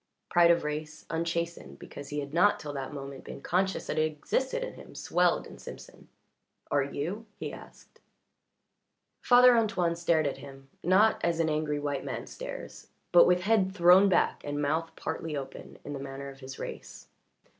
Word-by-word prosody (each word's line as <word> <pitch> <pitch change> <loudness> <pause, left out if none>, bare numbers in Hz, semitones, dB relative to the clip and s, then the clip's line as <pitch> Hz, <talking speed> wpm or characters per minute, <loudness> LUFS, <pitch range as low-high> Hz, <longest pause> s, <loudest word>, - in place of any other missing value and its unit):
Pride 175 -1 +5
of 170 0 +4
race, 150 0 -5
unchastened 170 - -3
because 140 - -10
he 145 0 -2
had 140 0 -8
not 185 +5 +4
till 150 -1 -6
that 135 -2 -5
moment 140 -1 -8
been - - -8
conscious 190 +6 0
that - - -2
it 155 0 +2
existed 265 - -1
in - - -5
him, - - -13
swelled - - +1
in - - -12
Simpson. - - -11 0.6
"Are 145 - +3
you?" 165 +11 -4
he - - -5
asked. - - -14 1.2
Father 245 0 +7
Antoine 205 -7 +1
stared 170 -2 +2
at 140 - -2
him, 135 0 -12
not 195 +6 +4
as 170 -1 +1
an 160 -1 +2
angry 150 -1 -1
white 145 -2 -2
man - - -5
stares, - - -8 0.2
but 175 - +8
with 180 0 +3
head 195 -1 +2
thrown 180 +2 +7
back 185 - +2
and 145 0 -3
mouth 155 +3 0
partly 160 -1 -4
open, 135 - -8
in 145 - -5
the 140 - -5
manner 140 0 -6
of 135 0 -12
his 130 -1 -9
race. - - -8
160 Hz, 175 wpm, -29 LUFS, 145-180 Hz, 1.2 s, but